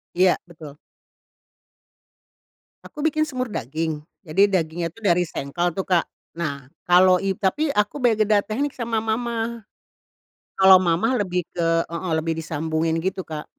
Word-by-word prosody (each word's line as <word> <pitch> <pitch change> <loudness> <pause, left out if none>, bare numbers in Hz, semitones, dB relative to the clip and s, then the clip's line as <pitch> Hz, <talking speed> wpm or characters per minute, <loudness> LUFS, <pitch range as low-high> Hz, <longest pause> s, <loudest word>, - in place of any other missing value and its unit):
Iya, 180 0 +4
betul. 155 -4 -12 2.1
Aku 300 - -12
bikin 310 0 +2
semur 255 -4 -3
daging. 155 - -3 0.2
Jadi, 195 +6 +3
dagingnya 170 -1 -1
tuh 225 +4 -18
dari 175 -1 +4
sengkel 175 +3 -2
tuh 190 +3 -4
Kak. 175 -3 +2 0.3
Nah 140 -6 -4 0.2
kalo 180 +1 +5
i 195 - +1
tapi 220 +10 0
aku 210 +1 0
beda 215 -3 +3
teknik 260 +7 -3
sama 230 -2 -1
mamah. 230 0 -2 0.9
Kalau 190 -1 +7
mamah 185 +8 +1
lebih 180 -3 -1
ke 165 -1 +1
heeh, 170 0 -3
lebih 160 0 -1
disambungin 160 0 -1
gitu 190 0 -3
Kak. 155 -1 -6
185 Hz, 135 wpm, -23 LUFS, 165-220 Hz, 2.1 s, Kalau